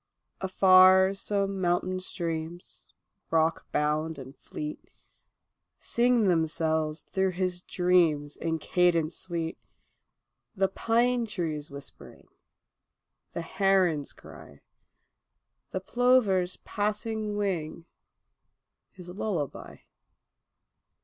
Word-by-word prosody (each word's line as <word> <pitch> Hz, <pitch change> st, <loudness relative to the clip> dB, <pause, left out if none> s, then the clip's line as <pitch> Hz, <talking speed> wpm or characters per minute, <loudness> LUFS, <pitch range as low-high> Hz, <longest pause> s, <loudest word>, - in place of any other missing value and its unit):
Afar 190 Hz, 0 st, +6 dB
some 195 Hz, -1 st, -1 dB
mountain 180 Hz, +1 st, 0 dB
streams, 170 Hz, -1 st, -5 dB, 0.4 s
rockbound 160 Hz, -1 st, 0 dB
and 135 Hz, 0 st, -10 dB
fleet, 150 Hz, 0 st, -7 dB, 0.9 s
Sing 240 Hz, -1 st, +2 dB
themselves 160 Hz, -2 st, 0 dB
through 190 Hz, -1 st, +1 dB
his 180 Hz, 0 st, -2 dB
dreams 170 Hz, -6 st, +1 dB
in 165 Hz, -1 st, -2 dB
cadence 170 Hz, -1 st, +1 dB
sweet, 170 Hz, -3 st, -4 dB, 1.0 s
The 195 Hz, -1 st, +2 dB
pine 235 Hz, +3 st, +1 dB
trees 160 Hz, -7 st, -3 dB
whispering, 140 Hz, 0 st, -10 dB, 1.1 s
the 170 Hz, -, -4 dB
heron's 185 Hz, -5 st, +1 dB
cry, 70 Hz, -, -14 dB, 1.1 s
The 190 Hz, -, -3 dB
plover's 200 Hz, -5 st, +2 dB
passing 210 Hz, 0 st, -2 dB
wing, 170 Hz, -5 st, -3 dB, 1.0 s
his 180 Hz, -2 st, -13 dB
lullaby. 180 Hz, -, -4 dB
180 Hz, 80 wpm, -28 LUFS, 160-195 Hz, 1.1 s, Afar